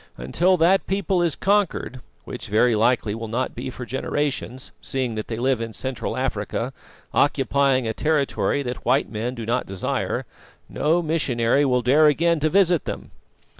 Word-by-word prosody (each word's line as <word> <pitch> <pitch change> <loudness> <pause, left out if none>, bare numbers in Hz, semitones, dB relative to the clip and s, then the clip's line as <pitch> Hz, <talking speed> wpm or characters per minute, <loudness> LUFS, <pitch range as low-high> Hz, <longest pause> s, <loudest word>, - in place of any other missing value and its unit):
Until 175 - +2
that 180 +4 +3
people 195 -1 0
is 170 -4 +1
conquered 195 -10 0 0.2
which - - -8
very 115 +3 +3
likely 110 -1 +2
will 115 +1 -5
not 125 +4 -2
be 130 +2 -5
for 125 -1 -7
generations, 130 -1 -3
seeing 130 -3 -2
that 110 -1 -5
they 110 - -4
live 125 0 +1
in 115 -1 -5
Central 130 +2 -4
Africa, - - -2 0.4
occupying 140 -2 +2
a 110 - -1
territory 145 0 0
that 125 -1 -5
white 130 +3 +1
men 115 +3 -3
do 115 -2 -6
not 120 +3 -1
desire 95 -1 -2 0.4
no 170 +3 +1
missionary 140 -4 +1
will 125 -2 +1
dare 145 +5 +5
again 165 +3 +2
to 155 +1 +1
visit 180 -2 +3
them." - - -6
130 Hz, 165 wpm, -23 LUFS, 120-155 Hz, 0.4 s, dare